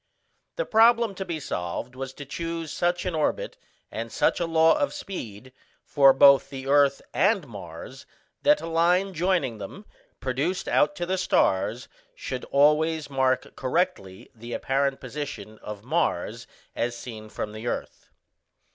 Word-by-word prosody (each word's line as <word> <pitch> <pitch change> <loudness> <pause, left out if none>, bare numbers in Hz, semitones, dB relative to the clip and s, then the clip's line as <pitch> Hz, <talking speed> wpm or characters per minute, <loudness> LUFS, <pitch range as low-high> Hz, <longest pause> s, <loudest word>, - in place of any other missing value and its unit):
The - - -2
problem 230 -1 +4
to 190 - -5
be 170 -3 -4
solved 90 - -4
was 135 0 -5
to 145 - -9
choose 165 +2 -4
such 175 +1 0
an 180 - -1
orbit - - -1 0.4
and - - -5
such - - +1
a 170 - 0
law 165 0 +4
of 290 -1 -1
speed, 130 - -7 0.3
for 135 -2 +6
both 140 +1 +6
the 135 -1 -7
earth 140 0 +3
and 195 -5 +2
Mars, 100 +4 -10 0.3
that 295 0 +4
a - - -5
line 175 +4 +2
joining 165 - 0
them, 150 - -9 0.3
produced 145 +9 -2
out 175 +7 +2
to 175 - -3
the 185 +1 -1
stars, 115 - +1 0.3
should 130 -1 -5
always 150 +2 +2
mark 130 -1 0
correctly 130 - -2
the 120 +1 -9
apparent 135 0 0
position 135 -5 -7
of 105 -1 -8
Mars 120 - -1 0.3
as 120 0 -2
seen 110 -3 -9
from 105 - -5
the 110 +2 -7
earth. - - -5
145 Hz, 150 wpm, -26 LUFS, 125-175 Hz, 0.4 s, for